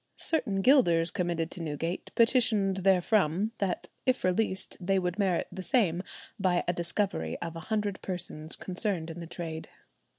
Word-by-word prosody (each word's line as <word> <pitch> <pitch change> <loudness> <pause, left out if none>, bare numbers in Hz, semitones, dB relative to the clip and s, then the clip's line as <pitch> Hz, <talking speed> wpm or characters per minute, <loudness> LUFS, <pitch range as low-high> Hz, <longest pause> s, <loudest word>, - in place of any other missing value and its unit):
Certain 245 -12 -1
gilders 170 - +5
committed 170 -2 -1
to 175 - -6
Newgate 165 +3 -3
petitioned 225 -5 +3
therefrom, 190 +1 +3
that 195 -3 -1 0.2
if 255 -1 +1
released 190 0 +1
they 195 +1 +1
would 180 +1 -1
merit 190 -4 +1
the 185 +1 -6
same 185 - +2 0.4
by 185 -2 +2
a 175 - +2
discovery 170 - -2
of 165 -1 -5
a - - -5
hundred 210 -3 -1
persons 170 -4 -4
concerned 185 -3 -2
in 165 - -8
the 170 - -7
trade. 160 -2 -6
185 Hz, 155 wpm, -29 LUFS, 170-205 Hz, 0.4 s, gilders